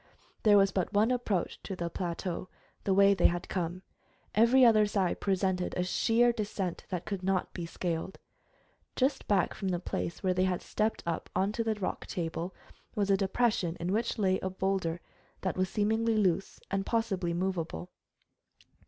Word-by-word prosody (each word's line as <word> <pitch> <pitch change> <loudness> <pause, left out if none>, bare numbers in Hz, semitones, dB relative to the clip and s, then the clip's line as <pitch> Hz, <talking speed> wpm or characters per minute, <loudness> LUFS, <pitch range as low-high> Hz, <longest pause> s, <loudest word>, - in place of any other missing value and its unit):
There 210 -2 +6
was 195 -1 +5
but 185 -3 -1
one 215 +4 +4
approach 220 -8 -1
to 195 - -5
the 170 -1 -3
plateau, 175 +1 -4 0.4
the 195 - +3
way 200 0 +6
they 190 - +5
had 175 0 -2
come. 180 0 -3 0.5
Every 240 +4 +6
other 215 -3 +6
side 195 -3 0
presented 190 -2 0
a 180 - +1
sheer 230 +6 +3
descent 205 -5 -3
that 180 -2 -3
could 200 -3 -3
not 190 0 0
be 170 -2 -5
scaled. 170 +1 -3 0.8
Just 270 +1 0
back 195 -4 +2
from 195 - -4
the 180 -2 +1
place 170 -1 -4
where 185 -1 +2
they 185 +1 +2
had 180 -1 -1
stepped 220 +1 -1
up 170 -1 -3
onto 210 +4 +1
the 220 -1 0
rock 200 -3 -4
table 170 +1 -3 0.4
was 200 -1 +1
a - - +6
depression 195 -3 +1
in 175 +2 -2
which 230 +3 0
lay 190 -3 +2
a 190 - -2
boulder 185 -3 -1 0.4
that 190 - -1
was 185 0 0
seemingly 220 +2 +1
loose 195 -2 +1
and 195 0 0
possibly 195 -6 0
movable. 180 -1 -3
190 Hz, 170 wpm, -30 LUFS, 180-210 Hz, 0.8 s, There